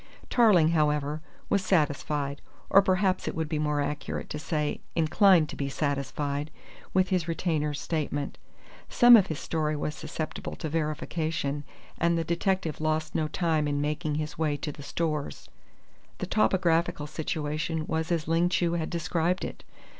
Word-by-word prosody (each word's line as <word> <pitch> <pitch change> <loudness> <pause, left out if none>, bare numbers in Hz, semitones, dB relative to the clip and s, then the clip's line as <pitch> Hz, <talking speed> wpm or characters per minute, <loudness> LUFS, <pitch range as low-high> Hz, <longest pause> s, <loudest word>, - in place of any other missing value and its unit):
Tarling, 205 -10 +5
however, 150 -2 +1 0.3
was 200 -1 +1
satisfied 145 -5 0 0.3
or 195 - +8
perhaps 190 0 +1
it - - -2
would 160 -1 -1
be 155 -1 -2
more 150 -1 +1
accurate 145 +1 -4
to 150 - -3
say 150 -1 -2
inclined 165 +1 +5
to - - -6
be 140 -1 -2
satisfied 145 +1 -2 0.4
with 185 0 +2
his 180 -3 0
retainer's 155 -4 -1
statement. 145 -3 -3 0.5
Some 240 0 +8
of 200 -4 +5
his 155 - -3
story 155 -2 -1
was 150 0 -2
susceptible 155 0 -5
to 155 - -4
verification, 155 -1 -2 0.4
and 170 0 +2
the 165 - 0
detective 170 -1 -1
lost 155 0 0
no 155 - 0
time 160 -2 0
in 145 0 0
making 150 +1 -1
his 150 0 -4
way 150 -2 +1
to 150 +1 -4
the 145 - -11
Stores. 150 0 -3 0.7
The - - -3
topographical 175 -6 +2
situation 155 +1 -3
was 160 +1 -2
as 165 -2 0
Ling 165 +2 +3
Chu 170 -1 +1
had 165 -2 -1
described 170 +1 0
it. - - -8
155 Hz, 155 wpm, -28 LUFS, 150-170 Hz, 0.7 s, or